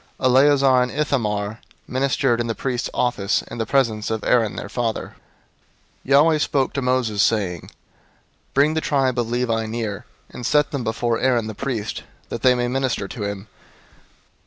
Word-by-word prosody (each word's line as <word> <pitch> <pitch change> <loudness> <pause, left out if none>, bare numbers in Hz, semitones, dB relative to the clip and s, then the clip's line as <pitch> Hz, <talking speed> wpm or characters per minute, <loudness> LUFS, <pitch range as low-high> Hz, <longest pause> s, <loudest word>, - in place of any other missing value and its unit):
Eleazar 135 0 +4
and 125 - 0
Ithamar 110 -7 -1 0.3
ministered 130 -2 +1
in 120 - -2
the 115 - -2
priest's 130 -2 -2
office 115 -5 0
in - - -9
the 115 - -2
presence 115 -6 +1
of 110 -1 -2
Aaron 115 -4 +2
their - - -5
father. 115 +1 -2
003:005 - - -20 0.9
Yahweh 150 +4 +5
spoke 140 -2 0
to 140 - -2
Moses, 125 -5 +1
saying, 95 -8 +1
003:006 - - -14 0.8
"Bring 145 +3 +4
the 160 - 0
tribe 135 -5 +1
of 115 -1 -1
Levi 115 -2 0
near, 110 -3 -4 0.3
and 125 - -8
set 150 +3 +2
them 140 -4 -3
before 115 +1 -1
Aaron 125 -3 +2
the 110 - -5
priest, 115 -3 -4 0.3
that 115 - -5
they 125 0 +5
may 120 0 0
minister 130 -5 -1
to 110 -5 -5
him. 100 0 -5
120 Hz, 170 wpm, -22 LUFS, 110-135 Hz, 0.9 s, Yahweh